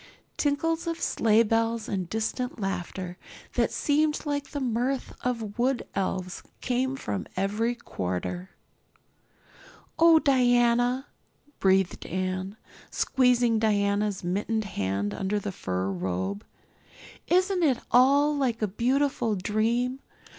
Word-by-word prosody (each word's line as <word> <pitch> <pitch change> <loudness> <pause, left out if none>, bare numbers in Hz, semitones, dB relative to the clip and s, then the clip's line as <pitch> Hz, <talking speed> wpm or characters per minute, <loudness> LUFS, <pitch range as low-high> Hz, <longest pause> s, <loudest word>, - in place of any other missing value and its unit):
Tinkles 325 +4 0
of 330 0 -2
sleigh 225 0 +3
bells 225 0 0
and 185 -4 -3
distant 225 +4 -2
laughter, 185 -2 -4 0.3
that - - +1
seemed 300 +1 +1
like 285 -1 -2
the 290 - -4
mirth 255 +1 -1
of 230 -3 -3
wood 255 +1 +1
elves, 185 -2 -2 0.2
came 260 +1 0
from 100 - -4
every 210 +5 0
quarter. 175 - -4 1.5
"Oh, 330 0 +7
Diana," 245 -2 +3 0.5
breathed 190 -1 +2
Anne, 185 +3 -3 0.3
squeezing 245 -3 +2
Diana's 205 -2 +1
mittened 205 +5 -1
hand 100 - -2
under 190 - -1
the 205 0 -3
fur 95 - -2
robe, 95 +2 -3 0.8
"isn't 370 +1 +2
it 280 -7 +3
all 280 +4 +5
like 250 -6 0
a - - +2
beautiful 245 +1 +1
dream? 230 +6 0
225 Hz, 110 wpm, -27 LUFS, 190-260 Hz, 1.5 s, Oh